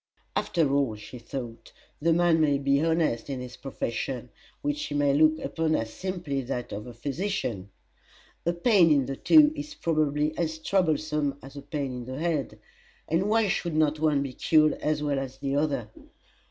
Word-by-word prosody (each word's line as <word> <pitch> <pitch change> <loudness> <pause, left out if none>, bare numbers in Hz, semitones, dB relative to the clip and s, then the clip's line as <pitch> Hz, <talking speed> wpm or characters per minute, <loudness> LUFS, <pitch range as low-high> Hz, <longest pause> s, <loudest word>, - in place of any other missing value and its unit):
After 155 -6 +1
all, 140 -6 +1
she 105 +4 -10
thought, 115 -2 -7 0.3
the 165 +2 +3
man 165 -1 +4
may 145 -2 +3
be 140 0 +2
honest 160 -8 +1
in 135 -2 -3
his 125 0 -8
profession, 125 -2 -4 0.3
which 290 0 -1
he 145 - -4
may 145 -1 +3
look 155 +2 +4
upon 160 -1 -1
as 110 0 -2
simply 175 -7 -3
that 125 -1 -4
of 105 +3 -6
a 120 - -8
physician. 135 - -3 0.8
A - - +4
pain 175 -1 +4
in 140 -3 +4
the 135 +1 -4
toe 300 - +6
is 300 0 -7
probably 155 -1 0
as 160 -2 -1
troublesome 155 -5 0
as 135 +2 -11
a 140 - -7
pain 140 -3 -4
in 125 -1 -6
the 130 +1 -6
head; 160 -3 -1 0.5
and 175 +6 +1
why 225 0 +3
should 170 -3 -1
not 155 -1 +2
one 150 -3 +2
be 135 -2 -5
cured 155 +3 +4
as 150 0 0
well 145 -2 0
as 135 -1 -6
the 140 0 -2
other? 140 -7 -1
150 Hz, 180 wpm, -27 LUFS, 135-165 Hz, 0.8 s, toe